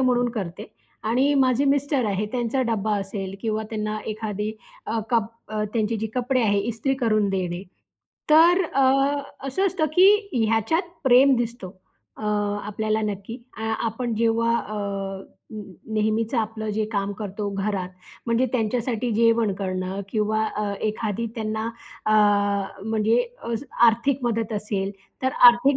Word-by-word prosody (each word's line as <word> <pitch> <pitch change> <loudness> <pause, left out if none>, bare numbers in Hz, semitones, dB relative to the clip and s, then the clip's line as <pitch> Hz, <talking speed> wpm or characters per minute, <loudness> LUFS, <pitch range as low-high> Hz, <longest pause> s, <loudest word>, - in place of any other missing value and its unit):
म्हणून 245 -1 +2
करते 195 -7 -5 0.4
आणि 255 +6 +2
माझे 265 0 +3
मिस्टर 280 -1 +2
आहे, 205 +1 0
त्यांचा 245 +1 0
डब्बा 220 -3 0
असेल 195 -1 -5
किंवा 220 -1 -1
त्यांना 215 -1 -2
एखादी 215 -1 -3 0.3
अ, 225 +1 -1
कप 230 -3 +2 0.5
त्यांची 225 -1 0
जी 220 +1 -2
कपडे 255 +1 +1
आहेत, 205 -2 +2
इस्त्री 235 +4 -1
करून 215 -6 +1
देणे. 180 -2 -2 0.7
तर 340 +4 +7
अ, 275 -4 0 0.6
असं 325 +9 +1
असतं 370 -4 0
की 370 +3 +7 0.4
ह्याच्यात 225 - +1 0.2
प्रेम 265 +2 +6
दिसतो 235 -4 -3 0.5
अ, - - -10 0.4
आपल्याला 215 +1 -1
नक्की. 205 +2 -4 0.2
अ, - - -5 0.2
आपण 230 +1 -2
जेव्हा 230 +1 +2
अ, 215 - -6 0.8
न 215 - -6 0.3
नेहमीच 220 +2 0
आपलं 220 -2 -1
जे 215 +1 0
काम 200 -1 -1
करतो 205 0 -3
घरात, 195 -2 -2 0.4
म्हणजे 235 +2 +2
त्यांच्यासाठी 235 0 -1
जेवण 230 -2 +3
करणं 185 0 -3
किंवा 215 0 0
अ, 210 -1 -1
एखादी 215 +1 -2
त्यांना 220 -1 -2 0.4
अ, 215 - +3 0.7
म्हणजे 220 +2 +2 0.3
अस 230 +3 -2 0.2
आर्थिक 245 +4 +1
मदत 225 -2 -1
असेल, 205 -2 -2 0.3
तर 260 - +2 0.2
आर्थिक 240 +4 +4
225 Hz, 135 wpm, -24 LUFS, 210-245 Hz, 0.8 s, तर